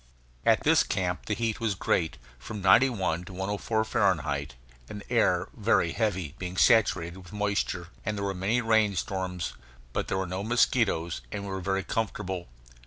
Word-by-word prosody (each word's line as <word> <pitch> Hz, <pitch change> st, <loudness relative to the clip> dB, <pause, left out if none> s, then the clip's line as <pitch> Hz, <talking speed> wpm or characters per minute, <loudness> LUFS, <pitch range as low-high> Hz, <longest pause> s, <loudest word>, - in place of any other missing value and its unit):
At -, -, +5 dB
this -, -, +5 dB
camp 90 Hz, -1 st, -2 dB
the 105 Hz, -, 0 dB
heat 115 Hz, 0 st, -1 dB
was 110 Hz, -4 st, 0 dB
great 80 Hz, -5 st, 0 dB, 0.2 s
from 105 Hz, -, -7 dB
91 95 Hz, -4 st, +3 dB
to 95 Hz, -, -10 dB
104 105 Hz, +4 st, -1 dB
Fahrenheit 75 Hz, -, 0 dB, 0.3 s
and 105 Hz, -, -7 dB
the -, -, -16 dB
air -, -, +3 dB
very 85 Hz, -, +2 dB
heavy, 95 Hz, -9 st, -1 dB
being 90 Hz, 0 st, -5 dB
saturated 95 Hz, -8 st, +3 dB
with 90 Hz, -2 st, -13 dB
moisture; 100 Hz, -4 st, -1 dB
and 105 Hz, 0 st, -2 dB
there 100 Hz, -, -2 dB
were 100 Hz, -, -1 dB
many 100 Hz, +6 st, 0 dB
rain 110 Hz, -3 st, +3 dB
storms. 90 Hz, -1 st, -3 dB, 0.4 s
But -, -, -1 dB
there 95 Hz, -, -1 dB
were 95 Hz, -, -1 dB
no 95 Hz, +2 st, -4 dB
mosquitoes, 110 Hz, -7 st, +1 dB
and 100 Hz, -1 st, -4 dB
we 100 Hz, -, -5 dB
were 95 Hz, -1 st, -3 dB
very 95 Hz, +1 st, 0 dB
comfortable. 95 Hz, -5 st, -3 dB
95 Hz, 175 wpm, -28 LUFS, 90-105 Hz, 0.4 s, At